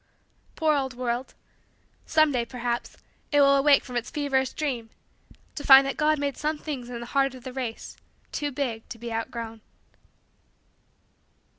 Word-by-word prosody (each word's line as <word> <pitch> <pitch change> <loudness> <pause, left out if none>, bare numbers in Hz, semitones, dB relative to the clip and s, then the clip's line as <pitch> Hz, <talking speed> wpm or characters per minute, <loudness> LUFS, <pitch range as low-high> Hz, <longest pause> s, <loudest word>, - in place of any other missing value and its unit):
Poor 315 -1 +2
old 265 -3 -2
world! 245 +1 -3 0.7
Someday, 305 -6 +3
perhaps, 240 0 -4 0.3
it 290 - +4
will 275 0 +6
awake 280 +1 +5
from 250 - -9
its 240 0 -2
feverish 270 -3 0
dream 255 -7 -3 0.6
to 290 - -6
find 270 0 +9
that 275 - -2
God 310 0 +2
made 285 -1 -2
some 305 +1 -1
things 275 -5 -6
in 240 -1 -6
the - - -6
heart 270 +1 +1
of 255 - -12
the 255 -1 -7
race 250 -4 -5 0.3
too 290 -1 -2
big 250 -5 -3
to 235 - -7
be 235 0 -6
outgrown. 225 0 -5
265 Hz, 155 wpm, -26 LUFS, 240-285 Hz, 0.7 s, find